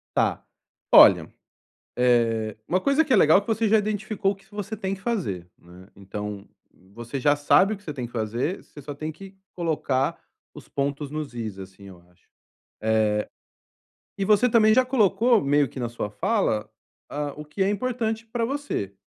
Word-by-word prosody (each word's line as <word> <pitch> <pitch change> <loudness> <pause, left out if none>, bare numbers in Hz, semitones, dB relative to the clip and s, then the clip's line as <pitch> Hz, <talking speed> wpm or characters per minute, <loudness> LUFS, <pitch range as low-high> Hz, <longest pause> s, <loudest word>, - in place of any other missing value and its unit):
Tá. - - +1 0.5
Olha, - - +7 0.7
eh, 115 -3 +2
uma 185 - +1
coisa 280 +3 +3
que - - +1
é - - +7
legal 160 +6 +6
que 200 - -16
você 225 0 +1
já 220 - +5
identificou 210 -1 -1
o - - -14
que 195 0 -24
você 205 +1 -5
tem 195 -2 -3
que 190 - -16
fazer, 130 - -3
né. 90 +2 -16
Então, 100 +1 -7 0.5
você 120 +4 -6
já 145 +3 +3
sabe 185 +8 +4
o - - -6
que 200 - -22
você 150 -6 -6
tem 125 -3 -5
que 120 - -11
fazer, 120 - -3
você 145 - -13
só 145 +1 -7
tem 155 +2 -5
que 195 +4 -13 0.2
colocar 155 -3 -1 0.3
os - - -13
pontos 140 +1 -3
nos 150 -3 -5
is, 110 -5 -5
assim, 95 +1 -11
eu 95 -3 -12
acho. 90 - -33 0.6
Eh, 110 -1 +2 1.1
e 195 - -1
você 215 +4 +4
também 220 -2 +5
já 255 +2 +4
colocou 230 -2 +3
meio 145 0 +2
que 130 - -9
na 120 - -2
sua 115 -3 -4
fala, 110 - 0 0.4
hã, 145 -1 -3
o 150 - -8
que 150 +6 -2
é 195 - +1
importante 225 0 -2
para 230 +1 -2
você. 270 - -3
150 Hz, 185 wpm, -24 LUFS, -, 1.1 s, Olha